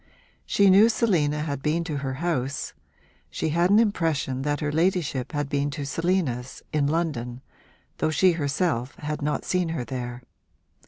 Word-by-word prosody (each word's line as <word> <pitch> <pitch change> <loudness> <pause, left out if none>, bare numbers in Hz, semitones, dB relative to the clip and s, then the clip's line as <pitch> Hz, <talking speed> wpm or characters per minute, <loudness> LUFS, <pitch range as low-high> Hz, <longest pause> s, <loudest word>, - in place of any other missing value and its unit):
She 200 -1 +5
knew 205 +4 +7
Selina 160 -11 +1
had 140 -3 -3
been 155 +4 0
to 155 -3 -3
her 135 -1 -3
house; 145 -3 -2 0.6
she - - -2
had 170 +3 +2
an 205 - +6
impression 165 - +1
that 145 +1 -1
her 150 -2 -1
ladyship 160 -5 0
had 145 -2 -2
been 140 0 0
to 145 - -3
Selina's, 140 -5 -1
in 145 -2 +2
London, 145 -7 -2 0.6
though - - +1
she 180 +5 +4
herself 145 -4 -1
had 150 0 -4
not 150 +1 -1
seen 180 -2 0
her 160 -7 -3
there. 125 0 -5
150 Hz, 160 wpm, -25 LUFS, 135-170 Hz, 0.6 s, knew